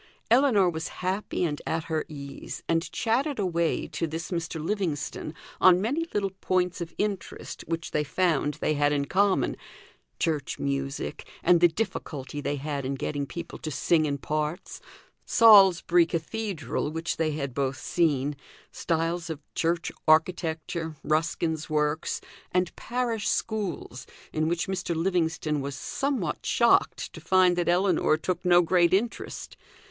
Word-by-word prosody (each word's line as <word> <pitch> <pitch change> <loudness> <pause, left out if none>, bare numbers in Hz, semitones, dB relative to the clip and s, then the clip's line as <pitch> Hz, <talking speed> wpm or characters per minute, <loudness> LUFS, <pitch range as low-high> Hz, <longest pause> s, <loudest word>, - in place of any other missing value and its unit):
Ellinor 235 -7 +5
was 160 -2 -2 0.2
happy 190 0 -1
and 150 -4 -1
at 160 0 -1
her 160 -1 -2
ease, 140 -2 -8
and 165 +1 0
chatted 260 +5 0
away 170 -5 0
to 165 - -2
this 165 +3 -5
Mr. 170 -1 -3
Livingstone 160 -3 -3 0.2
on 180 -1 +7
many 285 - -1
little 200 -2 0
points 180 -1 0
of 170 -1 -6
interest 205 -3 -4
which 165 0 -3
they 150 - +1
found 150 -1 +1
they - - 0
had 145 0 +2
in 140 -1 0
common: 195 +5 +2 0.6
church 155 -4 -1
music, 140 +1 -3
and 175 -1 +5
the 175 - +8
difficulty 150 -6 -4
they 145 - -1
had 145 0 -3
in 135 +1 -2
getting 140 +1 -3
people 170 +3 -7
to 155 - -4
sing 155 +2 +2
in 140 -1 -1
parts; 150 +5 -3 0.4
Salisbury 190 -6 +6
Cathedral, 170 - -3
which 165 +2 -3
they 155 -2 0
had 140 -3 -3
both 135 0 -1
seen; 145 -4 +1 0.4
styles 165 0 -1
of 160 -3 -4
church 170 +2 0 0.2
architecture, 160 0 +1
Ruskin's 160 0 0
works, 150 0 0 0.3
and 180 -1 0
parish 235 -3 -2
schools, 195 - -3 0.3
in 155 0 +1
which 170 0 -1
Mr. 180 -3 -2
Livingstone 160 -3 0
was 140 0 -4
somewhat 275 - -2
shocked - - +2
to - - -10
find 185 -1 +4
that 175 -1 0
Ellinor 175 -3 +3
took 180 +3 -3
no 175 -1 +5
great 175 +1 +4
interest. 225 +4 -3
165 Hz, 145 wpm, -27 LUFS, 150-185 Hz, 0.6 s, the